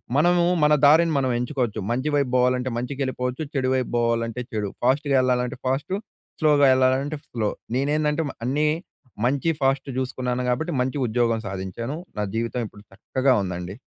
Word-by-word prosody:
మనము 175 +4 +4 0.2
మన 150 0 +5
దారిని 160 +3 +5
మనం 130 -1 0
ఎంచుకోవచ్చు, 125 -4 -2
మంచి 130 +5 0
వైపు 140 -3 +1
పోవాలంటే 125 0 +2
మంచికెళ్ళిపోవచ్చు, 130 +1 -3
చెడు 130 -2 0
వైపు 130 -2 -1
పోవాలంటే 115 0 0
చెడు. 105 -3 -2
ఫాస్ట్‌గా 140 +2 +2
వెళ్ళాలంటే 125 -1 0
ఫాస్టు, 135 +8 -1 0.4
స్లోగా 150 -2 +4
వెళ్ళాలంటే 130 +3 +2
స్లో. 110 -3 -1 0.3
నేనేందంటే 150 +3 +1
మా - - -7
అన్నీ 150 +4 +1 0.6
మంచి 140 +6 +1
ఫాస్ట్ 135 +1 +1
చూసుకున్నాను 125 -1 -2
కాబట్టి 155 +8 -1
మంచి 130 +3 -1
ఉద్యోగం 115 0 +1
సాధించాను 95 - -4 0.2
నా - - +1
జీవితం 115 +2 -1
ఇప్పుడు 105 0 -15
చక్కగా 130 +6 +1
ఉందండి. 90 0 -5
130 Hz, 145 wpm, -24 LUFS, 120-145 Hz, 0.6 s, మన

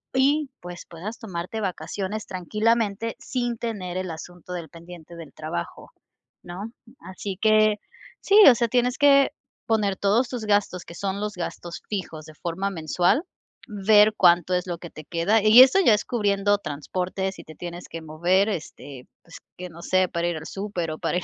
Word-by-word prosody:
Y, 280 +2 +2
pues, 175 0 -9
puedas 190 +7 -7
tomarte 190 +1 -5
vacaciones 200 +2 -4
tranquilamente, 215 +3 -1
sin 240 -2 -3
tener 195 -6 -4
el 185 -1 -3
asunto 175 +2 -9
del 170 -4 -6
pendiente 170 0 -12
del 165 -4 -11
trabajo, 155 - -6 0.5
¿no? 195 +6 -7 0.3
Así 190 0 -7
que 215 -1 +4 0.5
sí. 400 +1 +3
O 245 - +6
sea, 235 +1 +1
tienes 245 +1 +1
que 280 -1 +5 0.4
poner 210 -4 +1
todos 210 +7 +2
tus 245 -3 -5
gastos, 205 -3 +1
que - - -11
son 200 +1 -3
los 210 0 -3
gastos 175 -1 -6
fijos, 165 -6 -5
de 155 - -13
forma 175 +5 -3
mensual. 175 - +1 0.4
Ver 210 0 +4
cuánto 175 0 +4
es 180 0 0
lo 175 -1 -3
que 170 0 -10
te 155 - -12
queda, 175 +8 +1
y 215 +4 +8
eso, 265 +9 +4
ya 225 - +7
es 210 - +1
cubriendo 205 -3 +1
transportes. 185 +5 -4
Si 170 - -11
te 155 - -12
tienes 175 0 -8
que 165 - -7
mover, 175 +6 +1
este, 145 -7 -7 0.2
pues, 165 - -13 0.2
que 180 0 -7
no 170 +1 -12
sé, 185 0 +1
para 170 0 -1
ir 175 - -1
al 155 - -8
súper 195 -4 -4
o 155 - -7
para - - -1
ir 180 - -2
190 Hz, 180 wpm, -24 LUFS, 170-215 Hz, 0.5 s, y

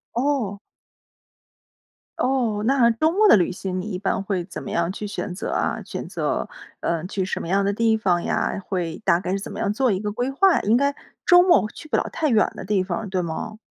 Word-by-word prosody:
哦。 240 -6 0 1.6
哦， 245 -5 +1
那 250 -2 +4
周 310 +8 +1
末 420 +2 +5
的 - - +8
旅 175 - +2
行 185 0 -4
你 185 - -5
一 185 - -2
般 195 +1 -1
会 195 -2 -2
怎 180 - -8
么 - - -7
样 170 +1 0
去 210 +2 -5
选 200 -2 -4
择 180 - -4
啊？ - - -1
选 - - -6
择， - - -2 0.3
呃， 170 0 -1
去 195 0 -2
什 185 - -3
么 - - -6
样 195 +3 +2
的 200 - +1
地 225 +2 +2
方 185 -5 +1
呀？ - - -1
会 175 -3 -3
大 175 -2 +3
概 185 - -3
是 195 - 0
怎 195 - -7
么 - - -7
样 200 - 0
做 255 +4 +1
一 190 - -2
个 210 - -2
规 245 +5 -2
划， 365 +7 +4
应 215 +3 +3
该 280 +3 +2 0.3
周 355 0 +8
末 350 - +4
去 310 - -11
不 - - -1
了 - - +2
太 315 - -1
远 225 -6 +3
的 - - -6
地 195 -2 +1
方， 225 +3 -4
对 185 -1 0
吗？ 175 +6 -5
205 Hz, 245 characters per minute, -23 LUFS, 185-250 Hz, 1.6 s, 的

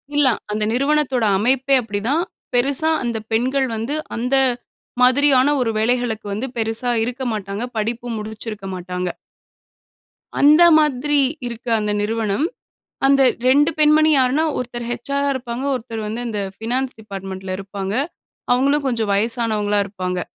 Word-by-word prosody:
இல்ல 290 -2 +5 0.2
அந்த 210 0 -1
நிறுவனத்தோட 275 -2 +1
அமைப்பே 260 +5 +2
அப்டிதான். 230 +9 -1 0.3
பெருசா 275 +6 +2
அந்த 235 -2 -2
பெண்கள் 260 +4 +1
வந்து, 230 +7 -3 0.2
அந்த 250 +3 0 0.7
மாதிரியான 265 +2 +5
ஒரு 230 -2 +1
வேலைகளுக்கு 230 -1 0
வந்து 225 +6 -3
பெருசா 225 +2 -1
இருக்க 250 +3 -4
மாட்டாங்க. 200 +1 -4
படிப்பு 230 +3 -2
முடிச்சிருக்க 215 -1 -7
மாட்டாங்க. 180 0 -4 1.3
அந்த 300 +4 +7 0.2
மாதிரி 295 0 +1 0.3
இருக்க 235 0 -8
அந்த 210 -1 -1
நிறுவனம். 220 +4 0 0.6
அந்த 275 0 +5 0.3
2 290 +4 +4
பெண்மணி 305 +1 +5
யார்ன்னா 265 +4 +2
ஒருத்தர் 240 -1 -5
ஹெச்ஆர்ரா 280 +4 -1
இருப்பாங்க. 245 0 -4
ஒருத்தர் 230 -3 -5
வந்து 225 +3 -4
இந்த 210 -2 -3 0.2
ஃபினான்ஸ் 255 +4 -2
டிபார்ட்மென்ட்ல 190 -2 -6
இருப்பாங்க. 195 0 -5 0.6
அவுங்களும் 280 +4 +2
கொஞ்சம் 225 -4 -1
வயசானவங்களா 215 -1 0
இருப்பாங்க. 185 -2 -3
240 Hz, 125 wpm, -20 LUFS, 215-270 Hz, 1.3 s, அந்த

